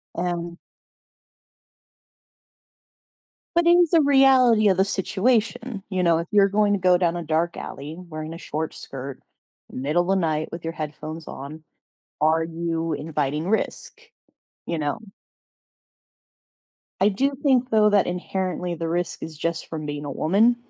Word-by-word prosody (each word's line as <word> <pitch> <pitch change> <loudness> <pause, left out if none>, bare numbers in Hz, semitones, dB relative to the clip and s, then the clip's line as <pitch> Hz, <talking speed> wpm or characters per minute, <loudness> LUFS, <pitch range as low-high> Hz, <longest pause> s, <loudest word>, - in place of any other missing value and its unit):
And 175 -1 -3 3.0
But 345 0 +3
in 350 +1 +7
s 340 - +3
the 330 - +5
reality 265 -6 +5
of 190 - +2
the 190 - +4
situation, 215 +2 0
you 185 -2 0
know, 170 -1 +4
if 170 - -4
you're 200 -2 +5
going 205 0 +2
to 200 - 0
go 180 -1 +4
down 175 -1 +1
a 170 - -4
dark 165 +2 0
alley 145 +3 -7
wearing 160 -3 -7
a - - -7
short 160 -1 -4
skirt, 135 0 -8 0.5
middle 150 +7 0
the 195 +2 +2
night 155 -4 0
with 170 0 -7
your 165 0 -3
headphones 155 +1 -6
on, 150 +4 -8 0.6
are 160 +1 +3
you 165 0 -2
inviting 150 +1 -2
risk? 220 - -2 0.7
You 170 - -2
know? 145 -2 -1 2.0
I 195 - +5
do 270 +8 0
think 255 -3 +3
though 215 -2 +4
that 205 -2 +3
inherently 180 0 -3
the 165 0 -4
risk 175 +1 -2
is 160 -1 -7
just 165 +2 -3
from 155 -2 -5
being 145 0 -5
a 145 - -4
woman, 200 - +3
175 Hz, 150 wpm, -24 LUFS, 160-205 Hz, 3.0 s, in